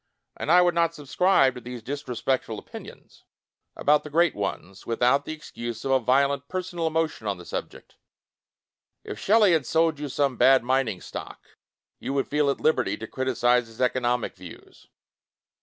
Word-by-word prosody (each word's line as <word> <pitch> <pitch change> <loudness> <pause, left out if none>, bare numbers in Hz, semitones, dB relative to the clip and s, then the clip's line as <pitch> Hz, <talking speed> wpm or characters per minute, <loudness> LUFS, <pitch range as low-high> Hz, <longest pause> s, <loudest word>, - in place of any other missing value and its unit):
And - - -2
I 180 +1 +7
would 175 -1 +2
not 170 0 +1
subscribe 145 -1 +2
to 125 - -9
these 120 -1 -8
dis 145 +4 -6
respectful 125 -2 -2
opinions - - -12 0.5
about 150 +1 +2
the 150 - -8
Great 170 +3 +3
Ones, 100 -2 -5
without 125 +4 +2
the - - -5
excuse 120 -7 -7
of 135 - 0
a 135 - +4
violent 140 +3 +1
personal 180 -2 -3
emotion 160 -8 -2
on 100 -2 -1
the 90 - -12
subject. - - -7 1.1
If - - -7
Shelley 210 -1 +4
had 155 -7 +1
sold 160 -2 +2
you 145 -1 -4
some 135 -2 0
bad 135 -2 +5
mining 120 -7 0
stock, - - -9 0.5
you 135 - -4
would 135 - 0
feel 150 -1 +1
at 140 - -1
liberty 155 - +1
to 115 - -7
criticize 125 -1 +1
his 115 0 -16
economic 125 -1 0
views. - - -14
135 Hz, 170 wpm, -25 LUFS, 120-155 Hz, 1.1 s, I